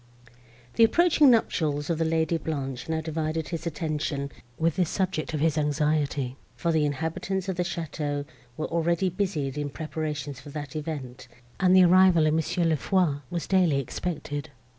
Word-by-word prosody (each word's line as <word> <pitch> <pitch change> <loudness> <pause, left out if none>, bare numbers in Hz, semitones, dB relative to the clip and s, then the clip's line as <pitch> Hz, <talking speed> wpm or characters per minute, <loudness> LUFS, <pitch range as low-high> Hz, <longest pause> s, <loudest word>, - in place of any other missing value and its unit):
The 230 - +7
approaching 310 +3 +5
nuptials 155 - +1
of 165 - -1
the 165 - +2
Lady 160 +1 +1
Blanche 135 -4 -4
now 160 0 0
divided 160 0 -2
his 165 0 -4
attention 150 -3 -2 0.3
with 165 +1 +1
this 180 -3 +1
subject 185 -5 -1
of 150 - -2
his 160 -1 +2
anxiety, 145 -3 0 0.2
for 170 - 0
the 155 -2 +2
inhabitants 160 +6 -3
of 190 - -1
the 180 - -1
château 150 -4 -3 0.3
were 155 - -2
already 170 +2 +1
busied 165 -7 -2
in 145 -1 -2
preparations 150 -2 -4
for 145 - -11
that 145 -1 -7
event, 145 -6 -5 0.3
and 185 -1 +5
the 185 - +8
arrival 180 -2 +6
of 155 - +3
Mons. 160 -1 0
St. 165 -4 +1
Foix 180 -4 +2
was 170 -3 -3
daily 180 -7 +3
expected. 145 0 -4
160 Hz, 165 wpm, -27 LUFS, 145-175 Hz, 0.3 s, the